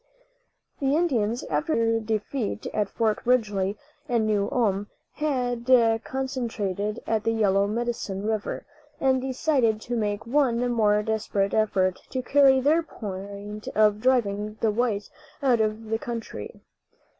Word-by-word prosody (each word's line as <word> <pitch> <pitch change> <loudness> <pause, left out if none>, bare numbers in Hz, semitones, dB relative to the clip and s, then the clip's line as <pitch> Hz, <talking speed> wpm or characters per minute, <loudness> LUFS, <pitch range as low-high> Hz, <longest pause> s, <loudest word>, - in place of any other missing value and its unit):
The 275 -1 +2
Indians, 245 -9 +1
after 315 0 -1
their 225 0 +2
defeat 220 +1 -3
at 210 -2 0
Fort 220 0 0
Ridgely 210 -5 +1 0.3
and 235 -2 +2
New 205 -2 +1
Ulm, 205 -6 +1 0.3
had 250 -5 -2 0.3
concentrated 225 -6 -3
at 220 -2 0
the 225 - +1
Yellow 200 -3 +2
Medicine 215 -3 -3
river, 215 -1 -2 0.3
and 260 -1 +2
decided 260 -4 +1
to 245 - -3
make 210 -2 -1
one 245 -2 +2
more 210 -3 +3
desperate 210 -2 -1
effort 190 -4 +1
to 255 -1 -3
carry 270 0 +5
their 300 +5 +3
point 205 - -7
of 210 -1 +4
driving 215 -4 +1
the 225 - +2
whites 210 -2 -1 0.3
out 245 -4 +4
of 215 0 -2
the 225 - +1
country. 230 - -6
225 Hz, 135 wpm, -26 LUFS, 210-250 Hz, 0.3 s, carry